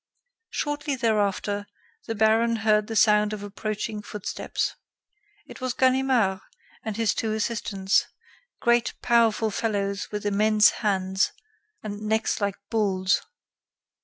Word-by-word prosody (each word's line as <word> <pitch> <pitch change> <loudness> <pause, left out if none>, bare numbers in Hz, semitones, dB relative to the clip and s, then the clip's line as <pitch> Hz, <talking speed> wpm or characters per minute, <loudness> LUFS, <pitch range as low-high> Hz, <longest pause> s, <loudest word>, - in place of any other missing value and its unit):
Shortly 295 -1 -2
thereafter, 205 -3 0 0.4
the 225 - -2
baron 220 +2 +3
heard 210 -1 +3
the 225 - -5
sound 210 -1 +4
of 205 -1 -6
approaching 210 +1 -4
footsteps. 210 -1 -3 0.7
It - - -12
was 255 -1 -2
Ganimard 255 -7 +2 0.4
and 220 -1 -4
his 225 -4 +2
two 220 - -2
assistants 210 -3 0 0.5
great, 235 0 +2
powerful 225 -2 +3
fellows 200 -2 -2
with 210 -1 -4
immense 210 +1 +4
hands, 190 -2 +1 0.5
and 205 -1 -6
necks 220 +1 0
like 200 -1 0 0.2
bulls. 195 -4 +1
215 Hz, 115 wpm, -25 LUFS, 205-225 Hz, 0.7 s, sound